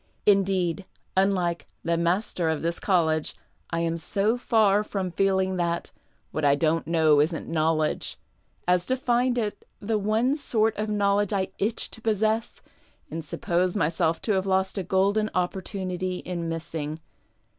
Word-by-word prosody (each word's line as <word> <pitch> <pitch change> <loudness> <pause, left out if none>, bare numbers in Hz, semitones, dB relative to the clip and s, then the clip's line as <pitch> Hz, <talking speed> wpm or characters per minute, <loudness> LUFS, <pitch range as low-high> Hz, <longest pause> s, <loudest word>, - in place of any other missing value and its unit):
Indeed, 195 -2 +2 0.3
unHke 185 -3 +1
'' - - -45
the 170 0 +1
master 170 0 0
of 160 -1 -1
this 170 +1 -1
college," 160 -5 +1 0.3
I 165 0 -1
am 165 0 0
so 200 +6 +1
far 215 -4 +3
from 195 -3 -3
feeling 190 +1 +1
that 170 -1 -1 0.2
" - - -41
what 155 - -3
I 140 -1 +5
don't 160 +1 +1
know 160 -3 +4
isn't 160 +2 -1
knowledge 155 -1 0 0.3
" - - -44 0.2
as 180 0 +2
to 260 - +1
find 245 0 +1
it 215 -3 -2 0.2
the 215 +1 -1
one 220 +6 +1
sort 220 -7 +1
of 215 +1 -2
knowledge 205 -1 +1
I 190 -1 0
iteh 215 +3 0
to 225 - -9
]iossess 220 0 0 0.5
and 165 +1 -4
suppose 175 +5 0
myself 160 0 +1
to 220 - 0
have 190 -1 +1
lost 190 +1 +1
a - - -2
golden 200 +4 +2
opportunity 185 0 -2
in 170 -2 -4
missing. 160 -2 -4
185 Hz, 160 wpm, -26 LUFS, 165-205 Hz, 0.5 s, I